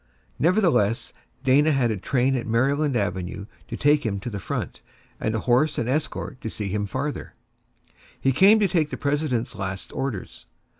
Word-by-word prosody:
Nevertheless, 165 - +2 0.3
Dana 145 +4 +4
had 130 -5 +2
a 105 - -2
train 130 +6 +1
at 120 - -3
Maryland 135 +5 +1
Avenue 95 -1 -3 0.2
to - - -5
take 145 +1 +3
him 100 -3 -1
to 120 - -5
the 100 - -4
front, - - -4 0.4
and 110 +1 -1
a 110 - -1
horse 130 +5 +2
and 115 - -1
escort 135 -1 -2
to 110 - -4
see 105 -2 -4
him 105 +1 -1
farther; 140 +7 -4 0.8
he 135 - +2
came 195 - +6
to 205 - +3
take 165 -4 +1
the - - -5
President's 140 -5 -1
last 95 0 -5
orders. 130 -8 -5
130 Hz, 170 wpm, -24 LUFS, 110-150 Hz, 0.8 s, came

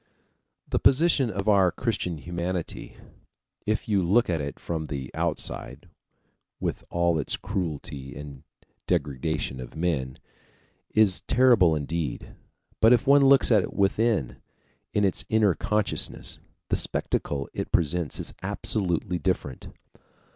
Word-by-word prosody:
The - - 0
position 140 -3 +4
of 100 0 -4
our 95 -4 +5
Christian 100 -8 -2
humanity, 85 +2 -4 0.7
if 110 0 0
you 100 -3 +2
look 95 +4 +3
at 80 -3 0
it 70 0 -5
from 80 -2 -3
the 70 -4 -5
outside - - -3 0.7
with - - -3
all 85 -2 +1
its 70 - -1
cruelty 75 -7 -4
and 70 -1 -9 0.5
degradation 70 -1 -1
of 65 - -9
men, 80 -6 -1 0.8
is 105 -4 +4
terrible 115 -10 +5
indeed. 75 -2 -3 0.5
But 115 +2 +7
if 125 +2 +2
one 140 +1 +6
looks 135 -1 +5
at 105 -3 +6
it - - -5
within, 100 - +1 0.5
in 105 -1 +2
its 95 - 0
inner 110 -4 +4
consciousness, 105 +6 -1 0.3
the - - +2
spectacle 70 -1 -2
it - - -4
presents 85 -1 0
is - - -5
absolutely 90 -3 -1
different. 80 -7 -2
90 Hz, 125 wpm, -26 LUFS, 75-105 Hz, 0.8 s, But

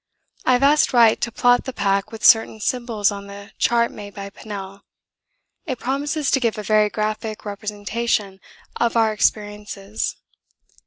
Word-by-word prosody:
I 255 - +4
have 250 +2 +2
asked 290 0 +4
Wright 230 -3 +5
to 235 - -1
plot 245 +1 +3
the 260 - -5
pack 200 -3 0
with 225 -1 -5
certain 225 -1 +5
symbols 230 -3 0
on 200 0 -7
the 200 0 -11
chart 235 0 +2
made 205 -1 -10
by 200 0 -7
Pennell. 195 -1 -8 0.9
It 260 -4 -2
promises 285 +4 -1
to 270 - +3
give 230 -4 0
a 210 - -4
very 215 +1 +3
graphic 215 +1 -3
representation 205 0 -2 0.4
of 235 0 +1
our 220 -1 +3
experiences. 210 0 -2
215 Hz, 155 wpm, -21 LUFS, 205-235 Hz, 0.9 s, Wright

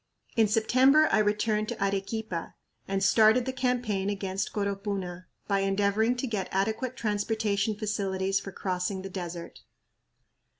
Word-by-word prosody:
In 225 -2 +4
September 255 +8 +4
I - - +4
returned 210 0 +1
to - - -5
Arequipa 195 -2 -2 0.3
and 195 0 -1
started 220 +4 +5
the 260 - -2
campaign 245 -7 0
against 195 -1 -2
Coropuna 195 -3 -3 0.2
by 200 -1 +2
endeavoring 200 +4 +2
to 245 - -2
get 210 -6 -3
adequate 220 +6 -1
transportation 210 -1 0
facilities 195 -2 -1
for 195 - -8
crossing 185 +1 -3
the 195 - -7
desert. 175 -2 -6
205 Hz, 130 wpm, -28 LUFS, 195-220 Hz, 0.3 s, started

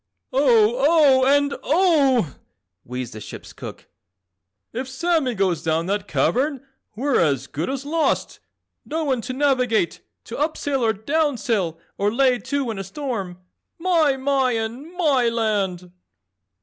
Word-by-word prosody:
"Oh! 240 -4 +4
Oh! 280 -3 +5
and 285 0 +3
OH!" 285 - +3 0.5
wheezed 125 0 -6
the 110 - -8
ship's - - -10
cook, - - -10 0.9
"If 255 +3 -4
Sammy 275 -2 0
goes 185 -5 0
down 160 +1 0
that 200 +1 -2
cavern 275 +4 0 0.3
we're 270 +4 +1
as 140 -5 +1
good 160 - -4
as 270 0 -4
lost. 320 +2 0 0.4
No 320 +1 -3
one 265 -5 0
to 255 +3 -5
navigate, 255 -8 +1 0.2
to 235 - -7
up 310 +2 0
sail 275 -3 -1
or 220 -1 +3
down 285 +6 0
sail 190 -10 -1 0.2
or 205 +1 +2
lay 250 +1 +3
to 265 +1 -2
in 210 - -6
a - - -3
storm. 195 -5 -5 0.4
My, 330 -6 +2
My 265 -2 +1
and 230 +8 -4
MYland!" 220 - +1
255 Hz, 140 wpm, -22 LUFS, 205-285 Hz, 0.9 s, Oh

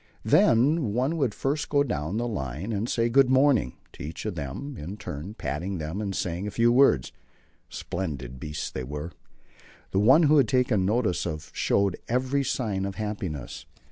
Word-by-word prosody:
Then 125 0 +4
one 130 +6 +1
would 135 -8 0
first 145 +2 -1
go 145 -1 +3
down 80 - -2
the 120 +1 -1
line 80 - -4
and 105 +4 -2
say 115 0 +1
"Good 130 +2 +4
morning" 130 - +3 0.2
to - - -12
each 80 +6 -6
of 105 - -2
them 80 - -6
in 90 +5 -7
turn, 95 0 -7
patting 85 +7 -3
them 80 +5 -4
and 100 -2 -3
saying 90 +3 -2
a - - -1
few 115 +3 +3
words. 120 - +4 0.6
Splendid 70 -9 -5
beasts 75 +2 -5
they 65 - -4
were. 75 +5 -6 0.8
The 95 - +2
one 130 +11 +6
who 150 0 +5
was 140 -4 +6
taken 120 -6 +2
notice 105 -5 +1
of 75 -2 -6
showed 100 -2 +1
every 130 +3 0
sign 105 -8 -1
of 100 -1 -4
happiness. 100 - -5
105 Hz, 175 wpm, -26 LUFS, 80-125 Hz, 0.8 s, one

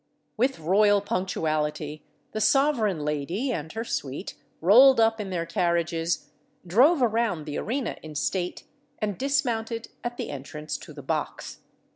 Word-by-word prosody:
With 255 +4 +1
royal 205 +5 +4
punctuality 155 -6 -2 0.3
the 215 - -3
sovereign 220 - +2
lady 165 - -1
and 160 -8 -4
her 225 - -3
suite 140 - -4 0.3
rolled 245 +9 +7
up 225 -1 +3
in 200 - -5
their 175 -3 -2
carriages, 170 0 0 0.4
drove 255 - +5
around 225 -8 +1
the 150 - -3
arena 255 +3 -2
in 155 -1 -9
state, 175 +4 -2 0.3
and 210 -2 -2
dismounted 235 -3 -1
at 240 0 -4
the - - -4
entrance 150 +2 -6
to - - -11
the 145 -2 -10
box. 155 +2 -3
190 Hz, 140 wpm, -26 LUFS, 155-230 Hz, 0.4 s, rolled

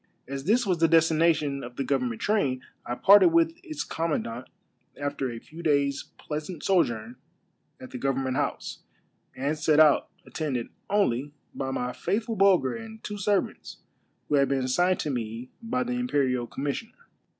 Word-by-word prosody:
As 135 +1 -5
this 230 +6 +3
was 180 -4 0
the 165 - +5
destination 160 -3 +3
of 120 0 -9
the 135 - -2
government 130 -4 -1
train, 135 -12 +1 0.2
I 120 - -2
parted 205 - +7
with 335 -1 +3
its 315 -4 -4
commandant 130 -7 -3 0.5
after 145 -2 -2
a 120 - -6
few 160 +8 -11
daj^s' 140 -3 +1
pleasant 155 +2 -6
sojourn 120 - +1 0.6
at 130 - -10
the 125 - -6
government 135 -1 -1
house, - - -2 0.6
and 140 +4 -1
set 155 0 +2
out, 155 -2 +5 0.2
attended 135 -7 -3 0.2
only 145 - +1 0.2
by 135 -1 -3
my 125 -1 -2
faithful 220 +5 -2
Bulger 190 -9 +4
and 225 -1 -9
two 205 -1 -5
servants, 200 0 -1 0.5
who 150 - +2
had 140 -1 +3
been 135 -1 +1
assigned 175 +8 +2
to 150 - -2
me 115 0 -5
by 250 +2 -1
the 245 0 -3
imperial 140 - 0
commissioner. 145 - -4
145 Hz, 160 wpm, -27 LUFS, 130-195 Hz, 0.6 s, parted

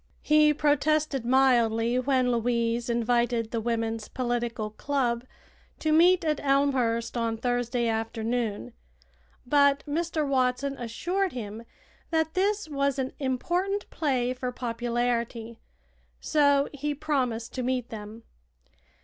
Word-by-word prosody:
He 305 0 +5
protested 300 -2 +1
mildly 240 -2 +3
when 255 -1 +2
Louise 235 0 0
invited 235 -1 +1
the 230 - -1
Women's 225 -1 -2
Political 240 -3 -2
Club 245 -1 -1 0.5
to 310 - -1
meet 345 +3 +5
at 305 -2 +1
Elmhurst 265 -5 +1
on 230 -1 -1
Thursday 245 0 -1
afternoon, 225 0 -2 0.7
but 280 +1 +3
Mr. 315 0 -1
Watson 265 +1 0
assured 350 - -2
him 225 -1 -6 0.4
that 320 -1 0
this 405 +1 0
was 280 -2 0
an 265 -1 -2
important 350 +10 -1
play 255 -5 0
for 250 0 -4
popularity, 235 -1 -2 0.6
so 285 -2 +3
he 290 +1 -3
promised 255 -6 -2
to 255 - -3
meet 250 -1 -1
them. 220 +1 -9
250 Hz, 115 wpm, -27 LUFS, 235-285 Hz, 0.7 s, He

